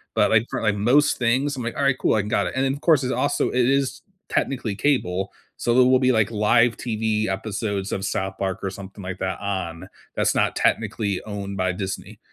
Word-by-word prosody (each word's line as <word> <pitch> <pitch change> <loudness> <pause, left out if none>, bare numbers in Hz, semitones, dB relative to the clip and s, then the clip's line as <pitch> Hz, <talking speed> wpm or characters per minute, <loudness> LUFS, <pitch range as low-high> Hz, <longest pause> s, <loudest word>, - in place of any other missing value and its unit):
but, - - +3
like, 110 +1 +4
for, - - -3
like, 110 -2 +1
most 125 +9 +3
things, 130 +4 +1
I'm 125 - -5
like, 115 - -4
"Alright, 140 -2 +2
cool, - - +2
I 110 - +2
can 105 - -6
got 100 -4 +1
it." - - -5
And 130 +1 +1
then, 135 - +1
of 140 - -8
course, 155 -6 +4
it's 130 - -1
also - - +1
it 125 -1 +2
is 135 0 0 0.3
technically 120 -6 -1
cable, 95 -7 0 0.3
so 120 - 0
there 125 +1 +6
will 130 0 +5
be, 130 -1 +3
like, 110 -3 +2
live 115 +2 +3
TV 110 -2 -1
episodes 100 0 -3
of 95 - -3
South 95 0 -2
Park 95 -1 -2
or 95 - -1
something 100 +1 -10
like 90 0 -6
that 95 0 -2
on, 95 -3 -4 0.3
that's - - +1
not - - +1
technically 100 -4 0
owned 100 -2 -5
by 95 0 +1
Disney, 95 +1 -6
110 Hz, 225 wpm, -23 LUFS, 95-125 Hz, 0.3 s, there